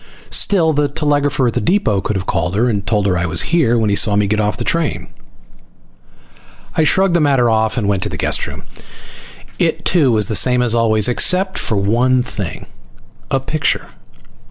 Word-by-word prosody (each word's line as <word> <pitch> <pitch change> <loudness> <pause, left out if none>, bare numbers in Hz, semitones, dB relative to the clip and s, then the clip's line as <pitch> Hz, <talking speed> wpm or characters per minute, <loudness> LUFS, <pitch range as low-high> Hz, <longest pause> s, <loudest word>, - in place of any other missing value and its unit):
Still, 165 -6 +3
the 145 0 +1
telegrapher 145 -2 0
at 120 - 0
the - - -2
depot 105 - 0
could 105 - -3
have 95 0 -3
called 90 0 -2
her 115 +4 +1
and 105 -4 -3
told 105 -2 0
her 95 -2 +1
I 85 - -1
was 85 0 +1
here 135 -9 +2
when 110 -2 0
he - - +1
saw 105 0 +3
me 105 0 +2
get 105 +2 -1
off 105 -1 -1
the - - -4
train. 165 -2 -2 1.7
I 160 - +2
shrugged 190 +4 +2
the 170 - +2
matter 135 -5 +2
off 110 +1 0
and 110 -4 -1
went 100 -2 0
to - - 0
the - - -6
guest - - -1
room. - - -9 1.0
It - - -1
too 155 -8 +2
was 110 -2 +2
the 110 - -4
same 125 +3 +3
as 120 -2 +1
always, 110 -3 +2
except 185 +9 +1
for 110 - +1
one 120 +6 +1
thing. 100 -7 -6 0.6
A 135 - 0
picture. 145 +3 -2
120 Hz, 200 wpm, -16 LUFS, 105-145 Hz, 1.7 s, Still